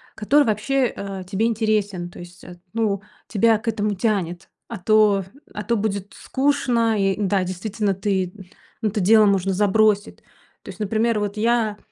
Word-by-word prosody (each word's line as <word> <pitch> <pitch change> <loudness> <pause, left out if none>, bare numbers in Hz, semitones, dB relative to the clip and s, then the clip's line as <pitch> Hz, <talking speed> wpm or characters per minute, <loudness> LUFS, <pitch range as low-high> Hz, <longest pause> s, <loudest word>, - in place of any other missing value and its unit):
который 285 +7 +3
вообще, 245 +5 +1
э, 195 -1 -6
тебе 205 +3 0
интересен, 210 -5 0
то - - -13
есть, 175 +1 -12
эт 175 0 -12
ну 215 -4 0 0.3
тебя 225 +1 +3
к 220 - -14
этому 210 -2 0
тянет, 185 -4 -2 0.2
а 230 - -6
то, 205 +1 +3 0.3
а 210 - -5
то 235 +1 0
будет 200 -2 -3
скучно 245 -5 0
и 195 -1 +1
да, 195 -1 +1
действительно, 195 +3 -2
ты 190 -2 -1 0.5
ну 220 - +1
это 210 +1 -3
дело 215 +3 +5
можно 195 -1 +1
забросить. 205 +1 +2 0.5
То - - -11
есть, - - -10
например, 220 +2 0
вот 205 0 -3
я 225 -1 +1
210 Hz, 165 wpm, -22 LUFS, 195-225 Hz, 0.5 s, дело